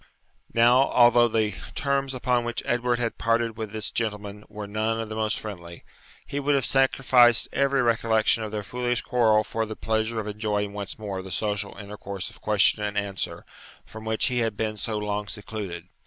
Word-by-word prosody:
Now, 120 +3 +5
although 120 0 +6
the 110 -2 +1 0.2
terms 140 -1 0
upon 125 -1 +1
which 120 0 -3
Edward 120 0 +1
had 120 -1 -3
parted 115 0 +1
with 110 -2 -5
this 110 -2 -3
gentleman 105 -2 -3
were 105 -1 -6
none 110 +2 -1
of 115 -1 -4
the 110 - -5
most 110 0 0
friendly, 85 -5 -8 0.4
he 140 - -3
would 145 0 +2
have 135 -2 +1
sacrificed 130 -3 +4
every 140 -1 +2
recollection 115 -1 +2
of 110 -1 -4
their 105 -1 -3
foolish 120 +2 -1
quarrel 110 -4 +3
for 110 +2 -2
the 110 - -6
pleasure 110 +1 -1
of 110 - -4
enjoying 105 -1 -2
once 100 -1 -6
more 100 -3 -4
the 95 - -9
social 105 +2 -2
intercourse 100 -2 -6
of - - -18
question 105 0 +3
and 105 0 -2
answer, 100 -2 -3 0.4
from 110 0 -10
which 110 0 0
he 125 -1 0
had 115 -3 -1
been 110 -1 -1
so 110 +1 -3
long 105 0 -2
secluded. 100 -5 -6
110 Hz, 185 wpm, -26 LUFS, 105-120 Hz, 0.4 s, although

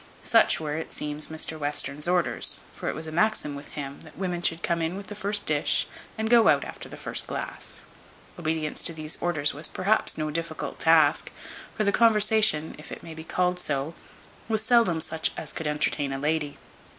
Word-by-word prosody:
Such - - +4
were, 150 -2 -3
it 160 - -6
seems, 150 0 -4
Mr 160 0 -3
Western's 145 +1 0
orders; 180 -1 +5
for - - -4
it - - -3
was 160 - -6
a 155 - -6
maxim 175 -3 +1
with 140 +1 -10
him, 140 -1 -6
that 155 -1 -15
women 180 -2 -3
should 165 -1 0
come 170 -1 0
in 165 +3 -2
with 200 - -7
the 210 - -8
first 205 0 -1
dish, 150 -1 +2 0.3
and 220 0 -1
go 230 -1 +5
out - - +4
after - - -8
the - - -9
first - - -1
glass. - - -5 0.6
Obedience 155 -2 -2
to 170 - +2
these 155 -1 -4
orders 155 -4 0
was 150 +3 0
perhaps 205 +4 +1
no 155 -1 -2
difficult 165 0 -4
task; 160 -2 +4 0.5
for 215 - +1
the 200 - +2
conversation 215 -7 +4
(if 150 - -12
it - - -8
may 165 - -8
be 160 0 -9
called 180 +2 0
so) 145 -1 -2 0.6
was 220 -1 +1
seldom 225 -8 +3
such 160 0 0
as - - -5
could 160 - -4
entertain 150 -1 0
a 135 - -3
lady. 150 0 -1
160 Hz, 200 wpm, -26 LUFS, 150-185 Hz, 0.6 s, orders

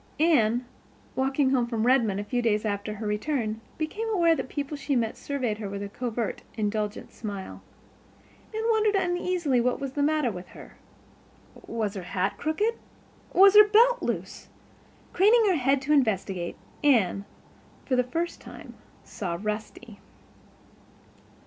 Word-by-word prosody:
Anne, 250 -7 +3 0.5
walking 270 +1 +1
home 250 -3 +2
from 230 -2 -1
Redmond 235 -6 +3
a - - -2
few 245 +4 -1
days 215 -2 +1
after 205 0 -2
her 215 +1 -6
return, 220 +1 -2 0.2
became 415 +9 -3
aware 340 -6 +3
that - - -2
the - - -9
people 285 +2 -4
that 285 - -10
she 280 - 0
met 230 -3 0
surveyed 250 -7 -3
her 205 -3 -4
with 200 0 -5
a 200 - -5
covert, 235 0 -3 0.2
indulgent 210 -1 -2
smile. 200 -4 -7 0.9
Anne 440 0 -3
wondered 430 -2 +2
uneasily 355 -7 +1
what 250 +1 0
was 275 -1 -4
the 285 - -2
matter 300 -4 +2
with 180 -2 -8
her. - - -12 0.9
Was 220 -3 -2
her 195 - -5
hat 190 +2 -2
crooked? 365 +10 0 0.6
Was 390 +1 +7
her 420 0 +9
belt 475 +4 +5
loose? - - -4 0.6
Craning 435 +5 +5
her 365 - +2
head 270 0 +1
to 295 +3 +1
investigate, 195 -9 0 0.3
Anne, 210 -8 +3 0.6
for 260 - +1
the 250 - +3
first 335 +7 -3
time, - - -11 0.3
saw 175 -4 -4
Rusty. 210 +1 -6
250 Hz, 155 wpm, -27 LUFS, 210-310 Hz, 0.9 s, her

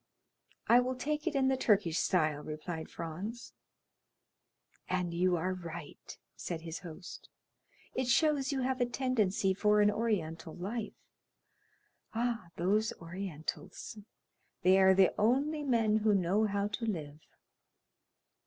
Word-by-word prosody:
"I 240 - +6
will 255 +1 0
take 300 +4 -2
it - - 0
in 270 -1 +3
the 265 - +3
Turkish 200 -9 +2
style," 155 -5 +1
replied 155 +2 -6
Franz. 190 +9 -6 1.4
"And 180 -2 -1
you 180 +1 +2
are 180 +3 -1
right," 170 -4 -8 0.2
said 165 -2 -5
his 165 0 -6
host; 175 +1 -10 0.6
"it 260 -1 -1
shows 280 +1 +3
you 270 -2 -1
have 255 0 -1
a 245 - +3
tendency 220 -7 +1
for 210 +2 +3
an 210 0 +5
Oriental 165 -8 -2
life. 210 +5 -4 1.2
Ah, 235 -4 -1
those 210 +6 +1
Orientals; 175 +3 -6 0.6
they 185 +1 +6
are 190 0 +6
the 190 -1 +5
only 280 +8 +2
men 230 -6 +2
who 215 -1 +3
know 195 +4 +2
how 200 -1 0
to 210 +3 -4
live. 155 -8 -4
200 Hz, 130 wpm, -32 LUFS, 175-240 Hz, 1.4 s, I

